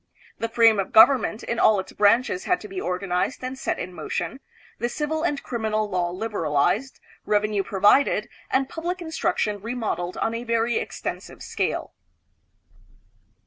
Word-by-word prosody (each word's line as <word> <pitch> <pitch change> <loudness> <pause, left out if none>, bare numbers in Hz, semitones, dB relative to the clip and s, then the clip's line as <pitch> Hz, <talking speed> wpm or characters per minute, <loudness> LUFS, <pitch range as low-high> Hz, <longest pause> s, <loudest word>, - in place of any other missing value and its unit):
The 230 - -2
frame 225 -2 +5
of 195 - -2
government 235 -2 +5
in 235 - -2
all 210 -2 +5
its 190 - -6
branches 250 - +2
had 360 - +2
to - - -8
be 380 -1 -5
organized 180 - -2
and 255 +1 -4
set 265 - -2
in 180 - -6
motion, 265 - -4 0.4
the 240 - -1
civil 310 +4 -2
and 295 -4 -1
crim 235 -2 -4
inal 215 -1 0
law 175 -1 0
liberalized, 200 - -1 0.2
revenue 210 -1 +1
provided, 205 +8 +3 0.2
and 265 0 +1
public 340 +5 -4
instruc 320 -3 -2
tion 205 -2 -1
remodeled 215 -6 -3
on 225 - -1
a 230 +1 -4
very 230 0 +1
extensive - - -5
scale. - - -2
225 Hz, 155 wpm, -24 LUFS, 205-265 Hz, 0.4 s, frame